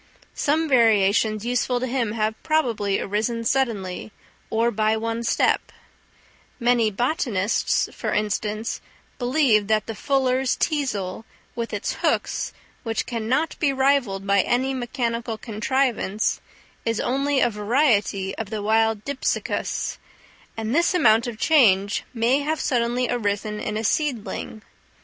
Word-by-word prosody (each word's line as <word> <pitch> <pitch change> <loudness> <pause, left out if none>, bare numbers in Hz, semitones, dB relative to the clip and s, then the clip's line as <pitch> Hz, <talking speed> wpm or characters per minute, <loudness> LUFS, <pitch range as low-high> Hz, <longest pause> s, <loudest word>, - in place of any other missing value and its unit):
Some 315 +3 +1
variations 220 -3 +3
useful 245 0 0
to 255 - -2
him 240 -4 -1
have 215 -1 0
probably 230 -11 0
arisen 220 +3 -1
suddenly, 220 -7 -1 0.4
or 230 +2 +1
by 215 +1 +1
one 230 +1 -2
step; 235 - +1 0.9
many 240 -2 +3
botanists, 230 - 0
for - - -3
instance, 215 +1 -2 0.4
believe 245 -5 +3
that 215 0 +2
the 225 - -5
fuller's 265 +1 +1
teasel, 225 - -2 0.3
with 235 -1 -3
its - - -2
hooks, - - 0 0.3
which 225 -2 -2
can 230 -3 -4
not 300 +6 +1
be 290 -4 +2
rivalled 265 -8 +1
by 200 0 +4
any 260 +5 0
mechanical 235 -3 -2
contrivance, 220 -1 -1 0.4
is 230 -1 -1
only 275 +2 +1
a 240 - +3
variety 210 -3 +1
of 220 -3 -4
the 215 -2 -4
wild 220 0 +2
Dipsacus; 280 -1 -2 0.6
and 225 +1 -2
this 340 +4 +2
amount 230 -8 +4
of 235 -3 -5
change 205 -9 +3
may 245 +3 +2
have 310 +2 -1
suddenly 245 -1 0
arisen 210 -2 -2
in 210 0 -3
a 220 - -3
seedling. 225 -4 -2
230 Hz, 130 wpm, -23 LUFS, 215-260 Hz, 0.9 s, by